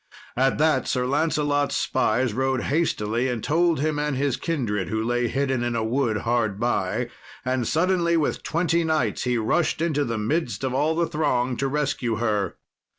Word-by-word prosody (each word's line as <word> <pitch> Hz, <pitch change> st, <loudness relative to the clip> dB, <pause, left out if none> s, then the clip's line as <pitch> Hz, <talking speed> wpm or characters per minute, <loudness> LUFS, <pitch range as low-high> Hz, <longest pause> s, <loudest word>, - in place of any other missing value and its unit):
At 135 Hz, +2 st, +2 dB
that 155 Hz, -3 st, +2 dB
Sir 125 Hz, -1 st, 0 dB
Lancelot's 145 Hz, 0 st, +1 dB
spies 125 Hz, -3 st, +1 dB
rode 130 Hz, +1 st, 0 dB
hastily 125 Hz, -6 st, 0 dB
and 120 Hz, -4 st, -3 dB
told 165 Hz, 0 st, +2 dB
him 155 Hz, -1 st, 0 dB
and 150 Hz, -1 st, -1 dB
his 140 Hz, -2 st, +1 dB
kindred, 110 Hz, -, -2 dB
who 110 Hz, 0 st, -1 dB
lay 120 Hz, +1 st, 0 dB
hidden 135 Hz, -1 st, 0 dB
in 120 Hz, -1 st, -1 dB
a 115 Hz, -, 0 dB
wood 115 Hz, -2 st, 0 dB
hard 115 Hz, -4 st, 0 dB
by; -, -, 0 dB, 0.4 s
and 130 Hz, -2 st, 0 dB
suddenly, 170 Hz, 0 st, +2 dB
with 155 Hz, -, 0 dB
twenty 170 Hz, 0 st, +1 dB
knights, 155 Hz, -11 st, 0 dB
he 125 Hz, -1 st, +1 dB
rushed 135 Hz, +11 st, +1 dB
into 155 Hz, -3 st, +1 dB
the 115 Hz, -4 st, -2 dB
midst 130 Hz, +5 st, -1 dB
of 130 Hz, -1 st, -1 dB
all 150 Hz, +4 st, +1 dB
the 170 Hz, +1 st, +2 dB
throng 130 Hz, -6 st, 0 dB
to 135 Hz, -, 0 dB
rescue 135 Hz, -4 st, -1 dB
her. 105 Hz, -3 st, -1 dB
135 Hz, 175 wpm, -24 LUFS, 120-155 Hz, 0.4 s, At